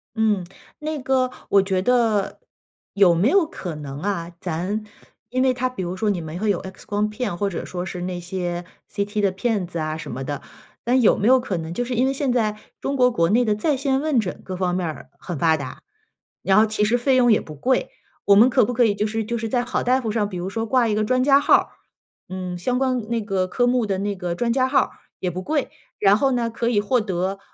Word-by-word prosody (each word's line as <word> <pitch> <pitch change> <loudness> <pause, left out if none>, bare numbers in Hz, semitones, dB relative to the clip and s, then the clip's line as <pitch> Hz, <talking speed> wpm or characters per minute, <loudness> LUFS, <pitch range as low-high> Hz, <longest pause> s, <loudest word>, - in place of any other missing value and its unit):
嗯， 215 -5 +1 0.3
那 305 -1 -3
个 255 -1 +1 0.2
我 200 - +5
觉 190 -1 0
得， 225 -3 +1 0.5
有 190 -4 +5
没 185 +9 +3
有 350 -1 +4
可 180 - -6
能 145 -1 -7
啊， 175 -3 -2
咱 185 +6 -3 0.5
因 255 +2 0
为 260 -1 +3
他 255 0 -1
比 250 -7 -6
如 180 +1 -4
说 215 +1 0
你 180 -3 -2
们 160 +2 -6
会 215 0 +2
有 190 - -1
X 190 0 -10
光 210 +1 0
片， 210 -4 -3
或 200 +2 -1
者 175 - -5
说 180 -1 -4
是 180 -1 -6
那 180 0 -3
些 175 -1 -4 0.3
CT 205 +1 -2
的 195 -2 +2
片 205 0 -1
子 170 -1 -5
啊 155 0 -2
什 155 -5 -7
么 130 +3 -5
的。 145 0 -4 0.4
但 255 +2 +3
有 225 - +5
没 210 - +2
有 260 0 +6
可 200 -8 -3
能 165 +1 -5
就 245 +6 -2
是 250 0 -3
因 250 - +3
为 270 - +2
现 275 -2 -1
在 215 -3 0 0.2
中 275 0 -2
国 250 0 +5
国 170 -8 +1
内 235 +4 +3
的 210 - +2
在 275 +7 0
线 270 0 0
问 300 -5 +2
诊 190 -4 -4
各 185 -1 -6
方 180 -1 0
面 180 -1 -1
儿 155 - -6
很 175 -5 -6
发 160 -2 +4
达， 130 -3 -7 0.6
然 195 +1 +3
后 220 - +6
其 215 -1 0
实 230 +3 +3
费 260 +2 +2
用 245 -2 +5
也 215 - +5
不 155 - -10
贵。 250 - 0 0.4
我 200 - +6
们 235 +5 +7
可 - - +4
不 245 - -3
可 240 0 +4
以 210 - +2
就 210 +1 -1
是 220 +1 -2
就 235 +2 -2
是 225 0 -3
在 245 +1 +1
好 245 - -2
大 255 +2 +2
夫 225 -3 -2
上， 210 -2 0
比 185 - -6
如 180 +2 -3
说 225 +2 -2
挂 245 0 +2
一 - - +1
个 215 +1 +1
专 255 +3 +2
家 275 0 +6
号 - - +3
儿， - - +2 0.6
嗯， 185 -1 -5
相 250 +8 -1
关 255 -1 +1
那 230 -1 0
个 195 -3 -1
科 245 +6 +1
目 245 -2 +2
的 195 -2 -1
那 205 +1 -1
个 180 -2 -3
专 235 +4 0
家 260 0 +2
号 270 0 +4
儿 - - -3 0.3
也 180 -1 -2
不 185 - -5
贵。 295 +6 -1 0.3
然 200 0 +5
后 270 +3 +2
呢， 235 -1 0
可 230 +1 -3
以 205 -4 +2
获 245 +4 +2
得 190 -1 -2
210 Hz, 275 characters per minute, -22 LUFS, 185-245 Hz, 0.6 s, 们